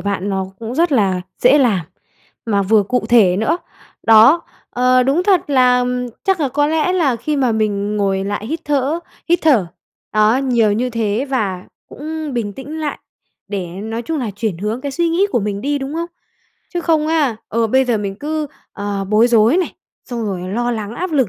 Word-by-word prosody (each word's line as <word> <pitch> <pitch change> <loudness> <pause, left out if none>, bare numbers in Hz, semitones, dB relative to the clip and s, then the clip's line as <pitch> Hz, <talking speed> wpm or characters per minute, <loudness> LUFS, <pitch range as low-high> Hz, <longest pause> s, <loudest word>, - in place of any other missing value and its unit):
bạn 200 -1 -2
nó 190 -1 -1
cũng 230 +2 -6
rất 335 0 +2
là 195 -6 +2 0.2
dễ 265 +4 +6
làm, 200 - +2 0.6
mà 200 -3 +1
vừa 210 +1 +3
cụ 250 +5 -1
thể 200 -7 +5
nữa. 220 - +1 0.5
Đó. 225 +10 +6 0.3
Ờ, 255 +1 +3
đúng 280 +7 +2
thật 370 -6 +2
là 250 -2 +4 0.4
chắc 385 -4 +1
là 280 - +1
có 290 +3 +1
lẽ 320 +3 +1
là 295 -10 +1
khi 295 +6 -2
mà 255 -4 +2
mình 210 -1 -1
ngồi 195 -1 0
lại 205 +2 -3
hít 320 +4 -3
thở 290 +2 0 0.3
hít 345 - +4
thở, 255 - +4 0.5
đó, 215 +3 +4
nhiều 240 -6 +2
như 245 +4 -1
thế 225 +2 -1
và 195 -8 -1 0.2
cũng 310 0 -6
bình 210 -4 -2
tĩnh 300 +7 -7
lại 300 -2 -3 0.5
để, 195 -3 -3
nói 220 +7 -5
chung 320 +4 -3
là, 235 -5 -2
chuyển 210 -6 -2
hướng 215 +5 -3
cái 280 0 -4
suy 340 +3 +1
nghĩ 365 +5 +2
của 240 - +2
mình 200 0 -3
đi, 285 +2 -1
đúng 275 +3 -5
không? 335 +1 -2 0.7
Chứ 350 - 0
không 315 -2 +1
á, 295 -8 +1
ừ, 230 +1 +1
bây 260 +4 +3
giờ 235 -4 0
mình 195 -1 -4
cứ, 305 0 -2 0.3
ờ, 200 -1 -3
bối 215 +3 +4
rối 230 +6 +4
này, 370 - -1 0.3
xong 235 -2 -4
rồi 190 -3 -3
lo 240 +4 -1
lắng 220 -1 -4
áp 360 +2 -4
lực 265 -8 +2
240 Hz, 205 wpm, -18 LUFS, 210-290 Hz, 0.7 s, dễ